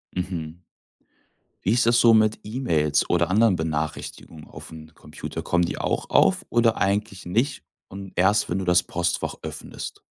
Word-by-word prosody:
Mhm. 85 -2 -5 1.0
Wie 100 - +2
ist 120 +1 +3
das 120 +1 +4
so 115 -1 +6
mit 110 -1 +3
E-Mails 80 - 0
oder 85 -1 +2
anderen 105 +1 +4
Benachrichtigungen 80 0 -5
aufm 80 0 -11
Computer, - - -8
kommen 85 0 +1
die 85 - -3
auch - - -2
auf - - +3
oder 115 -1 +3
eigentlich 100 -1 -1
nicht 120 +10 -1 0.2
und 95 0 -9
erst, 100 +4 +3
wenn 90 +2 -1
du 95 - -4
das 90 0 +4
Postfach 85 0 -2
öffnest? - - -7
95 Hz, 155 wpm, -24 LUFS, 85-110 Hz, 1.0 s, so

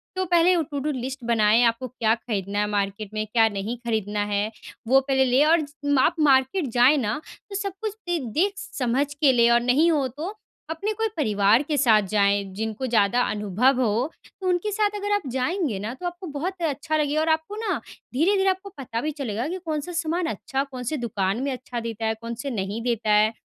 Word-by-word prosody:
तो 375 - 0
पहले 350 +1 +4
O 335 - +2
two 285 - -2
do 300 +2 -1
list 260 -1 -5
बनाएँ, 225 0 +4
आपको 235 +2 +1
क्या 225 -3 +1
खरीदना 205 -3 -3
है 210 - +1
मार्केट 200 0 -2
में, 215 0 -2
क्या 225 +1 +4
नहीं 205 +4 -4
खरीदना 210 -2 -1
है? 205 +1 -1 0.4
वो 270 +2 +6
पहले 265 0 +2
ले 255 +3 +4
और 325 +1 +4
ज 290 -1 -8
माप 285 +4 +3
मार्केट 275 +3 +3
जाएँ 260 +5 +6
ना, 230 +3 -1 0.3
तो 395 - -7
सब 395 -1 -2
कुछ 435 -2 -2
दे 350 - +1 0.2
देख 390 +5 +2
समझ 285 - -1
के 285 -1 +4
ले 235 -1 +5
और 235 0 +5
नहीं 280 +8 +3
हो 285 -5 +1
तो, 315 - -6 0.3
अपने 325 +7 -2
कोई 445 +1 0
परिवार 210 -3 +3
के 300 0 -2
साथ 230 -6 +5
जाएँ, 200 -1 +2
जिनको 220 +5 -3
ज़्यादा 225 +1 +3
अनुभव 215 +5 +1
हो। 240 +5 0 0.3
तो 370 - -2
उनके 360 +4 +1
साथ 415 0 0
अगर 410 0 -3
आप 410 - +2
जाएँगे 265 - -1
ना, 215 +4 -4
तो 310 +8 -9
आपको 350 +1 -7
बहुत 350 +6 -4
अच्छा 310 0 -1
लगेगा 300 +1 +1
और 320 - 0
आपको 320 +5 0
ना 415 - -2 0.3
धीरे-धीरे 385 +8 +3
आपको 375 +2 -2
पता 235 -4 -4
भी 305 +3 -2
चलेगा 255 -3 -3
कि 365 +3 -3
कौन-सा 310 +1 -3
सामान 340 +1 -1
अच्छा, 275 -4 -2
कौन-से 260 +1 -4
दुकान 200 -2 -1
में 280 - -1
अच्छा 250 -1 -5
देता 225 -1 -4
है, 220 - +1
कौन-से 235 +4 -5
नहीं 205 -1 -3
देता 230 -3 0
है। 215 +2 +4
265 Hz, 210 wpm, -24 LUFS, 225-325 Hz, 0.4 s, वो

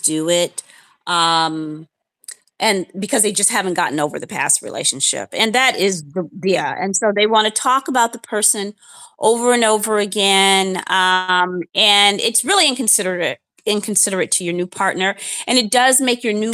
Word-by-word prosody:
do 155 +1 -1
it, 175 0 -1 0.4
um, 160 -2 -1 0.7
and 200 -5 0
because 210 +2 +1
they 205 - -1
just 205 -1 +2
haven't 190 -3 -2
gotten 165 -4 -3
over 150 0 -4
the - - -13
past - - 0
relationship, 135 +3 -2
and 220 +1 0
that 255 -1 +3
is 185 -4 -2
the 150 +3 -9
yeah, 190 -1 -2
and 190 +1 -4
so 215 +2 +1
they 205 - +3
wanna 215 -1 +2
talk 260 +7 -1
about 240 -5 0
the 240 - -12
person 210 -2 -1 0.5
over 235 +3 +1
and 240 -1 +1
over 215 0 +1
again, 195 -2 +2
um, 185 -1 +1
and 205 -1 +5
it's 230 +1 +1
really 380 -5 +4
inconsiderate 205 -8 0 0.3
inconsiderate 205 -2 0
to 180 +1 +1
your 170 -1 -5
new 175 +1 -5
partner, 190 +1 -2 0.3
and 245 - +2
it 220 -5 +1
does 260 +2 +5
make 245 -1 -1
your 220 -3 -2
new 215 +2 -4
200 Hz, 165 wpm, -16 LUFS, 180-220 Hz, 0.7 s, and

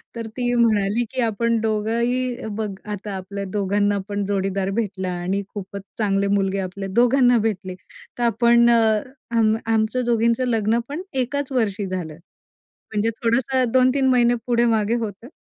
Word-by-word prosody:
तर 230 -1 -5
ती 245 -1 0
म्हणाली 220 -2 +2
की 260 -1 -2
"आपण 230 +1 +1
दोघंही, 235 +3 -1
बघ 215 -2 -2 0.2
आता 205 +1 -6
आपल्या 200 +2 -6
दोघांना 205 0 +1
पण 205 0 -2
जोडीदार 195 -1 -1
भेटला 190 -4 -3
आणि 195 +3 -1
खूपच 200 -1 -6 0.2
चांगले 200 -2 +1
मुलगे 195 -1 +1
आपले 195 +1 -4
दोघांना 245 +3 +4
भेटले 195 -4 -2 0.4
तर 240 - -1
आपण 235 +1 +4
आम 230 0 +1
आमचं 225 +2 +1
दोघींचं 235 +1 +2
लग्न 225 0 +1
पण 300 +5 -4
एकाच 270 +2 -2
वर्षी 215 -5 0
झालं. 180 -4 -4 0.8
म्हणजे 215 +2 +1
थोडंसं 245 +1 +1
2-3 260 +1 +3
महिने 245 -1 +4
पुढे 240 0 +3
मागे 215 +1 0
होतं. 225 -1 -5
225 Hz, 145 wpm, -22 LUFS, 200-240 Hz, 0.8 s, दोघांना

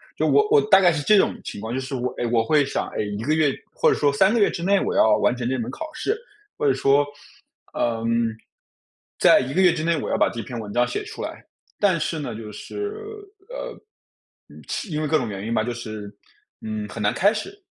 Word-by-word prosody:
就 - - 0
我 425 0 +4
我 440 -1 +6
大 195 - +8
概 180 -2 +5
是 160 -3 -2
这 210 +9 +5
种 - - +3
情 - - -7
况， 110 +3 -5
就 130 - -1
是 135 +1 -5
我 125 0 -1
诶， - - -1
我 115 -1 +2
会 150 +5 +3
想， 135 - -2
诶， 105 - -3
1 105 +1 -4
个 150 +5 +1
月 155 -3 +3 0.2
或 - - +3
者 - - +1
说 145 -1 +2
3 190 +8 +4
个 235 - +2
月 205 - +4
之 - - -5
内 195 +3 +3
我 - - -2
要 110 - +5
完 - - +2
成 120 -1 -3
这 130 - 0
门 115 - -4
考 320 -1 -6
试， 425 - -1 0.4
或 145 - +1
者 135 - +4
说： 140 +2 +4 0.7
“呃， 115 -1 -1 1.1
在 - - +6
1 130 +1 -3
个 185 - +2
月 180 -2 +6
之 155 -2 -3
内， 170 0 +1
我 - - -4
要 - - +1
把 - - +3
这 115 - -6
篇 120 +3 -7
文 105 -2 -7
章 120 +3 +2
写 420 - -3
出 435 +1 -7
来。” - - -7 0.4
但 190 -5 +3
是 160 +1 -2
呢， 125 -6 -5
就 110 -1 -8
是， 410 - -5 0.6
呃， - - -6 0.9
其 215 - -4
因 155 0 -1
为 155 - -1
各 155 +1 +3
种 150 - -2
原 100 0 -5
因 115 - -1
吧， 110 - +2
就 120 +1 -3
是， 110 -3 -7 0.5
嗯， 110 -1 -4
很 - - -7
难 105 - +2
开 205 +3 +3
始。 390 - -6
140 Hz, 255 characters per minute, -23 LUFS, 115-190 Hz, 1.1 s, 大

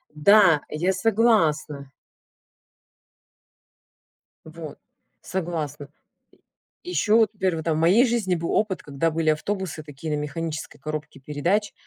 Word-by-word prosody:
Да, 170 -1 +5
я 175 +5 0
согласна. 175 - +1 2.5
Вот, 160 -1 -9 0.4
согласна. 155 -5 -4 0.9
Еще 225 -11 +1
вот 220 -3 +4
например 185 -5 -1
там 165 -1 0
вот - - -1
в - - 0
моей 195 +10 +5
жизни 220 -6 0
был 165 0 -3
опыт, 210 -3 0
когда 150 +3 -1
были 160 0 0
автобусы 175 -1 -3
такие 150 +1 -5
на - - -2
механической 155 +1 -5
коробке 155 -2 -6
передач. 170 +10 -1
165 Hz, 115 wpm, -24 LUFS, 150-195 Hz, 2.5 s, Да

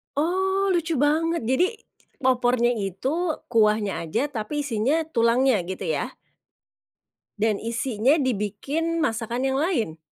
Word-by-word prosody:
Oh, 380 +5 +1
lucu 335 -2 0
banget 315 +3 +1
jadi 305 - +1 0.5
opornya 245 -1 +3
itu 255 - -2 0.2
kuahnya 215 -3 +2
aja 245 - -1
tapi 290 +5 -3
isinya 275 +5 +1
tulangnya, 235 0 +3
gitu 190 - -5
ya? - - -3 1.2
Dan 210 -1 +1
isinya 230 +3 +1
dibikin 280 +6 -1
masakan 235 -1 -1
yang 265 0 +1
lain? 240 - -1
260 Hz, 115 wpm, -24 LUFS, 225-315 Hz, 1.2 s, opornya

